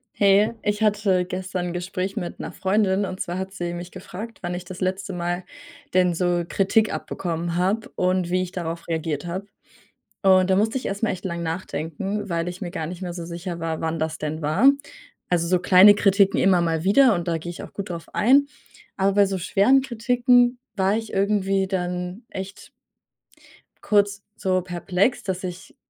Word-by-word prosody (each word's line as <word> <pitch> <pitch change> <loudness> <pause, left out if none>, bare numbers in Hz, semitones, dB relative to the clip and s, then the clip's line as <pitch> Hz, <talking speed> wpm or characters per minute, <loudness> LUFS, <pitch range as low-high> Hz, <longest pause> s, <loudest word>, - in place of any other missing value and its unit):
Hey, 205 +3 +4
ich 210 +1 -1
hatte 200 -4 +2
gestern 185 0 -4
'n 175 - -4
Gespräch 185 +3 -3
mit 175 -5 -5
'ner - - -5
Freundin. 195 0 +1
Und 185 0 -6
zwar 175 +1 -3
hat 190 0 -5
sie 175 -3 -4
mich 175 +1 -7
gefragt, 200 +4 -8
„wann 175 0 -3
ich 180 0 -6
das 185 +1 -9
letzte 190 +1 -2
Mal 175 +1 -2 0.5
denn 180 -1 +3
so 175 0 +1
Kritik 205 +4 +2
abbekommen 170 -1 -3
habe 195 +5 0
und 185 -1 +1
wie 185 0 +2
ich 185 -1 -4
darauf 170 -2 -5
reagiert 160 -1 -2
habe“. 185 +3 -4 0.8
Und 190 -1 +5
da 190 - +4
musste 220 +5 +1
ich 260 - -3
erstmal 205 +3 -1
echt 185 +1 -8
lange 170 -2 -3
nachdenken, 175 +4 -4
weil 170 -1 -1
ich 180 +1 -7
mir 180 -4 -4
gar 160 -4 -3
nicht 175 +2 -7
mehr 180 -2 -4
so 170 -1 -6
sicher 170 +1 -6
war, 160 -1 -3
wann 160 0 -2
das 160 0 -2
denn 155 +1 -4
war. 175 - +5 0.6
Also, 170 -1 +1
so 180 0 +2
kleine 190 +3 +8
Kritiken 200 -1 +3
immer 185 -1 +4
mal 165 -2 0
wieder. 225 +6 +5
Und 175 -1 -3
da 165 -1 0
gehe 170 +2 -6
ich 175 - -8
auch - - -10
gut 200 -1 -6
drauf 170 -1 -6
ein. 275 +5 +4 0.5
Aber 195 +1 +2
bei 200 0 +4
so 190 -1 -2
schweren 200 +9 +4
Kritiken 245 0 +3 0.2
war 195 +1 +2
ich 225 0 -5
irgendwie 195 -1 +1
dann 180 +2 -3
echt 190 +1 -8 1.1
kurz 205 -1 +2
so 185 -1 0
perplex, 180 +6 0
dass 190 -1 -3
ich 185 +1 -7
185 Hz, 190 wpm, -23 LUFS, 175-200 Hz, 1.1 s, kleine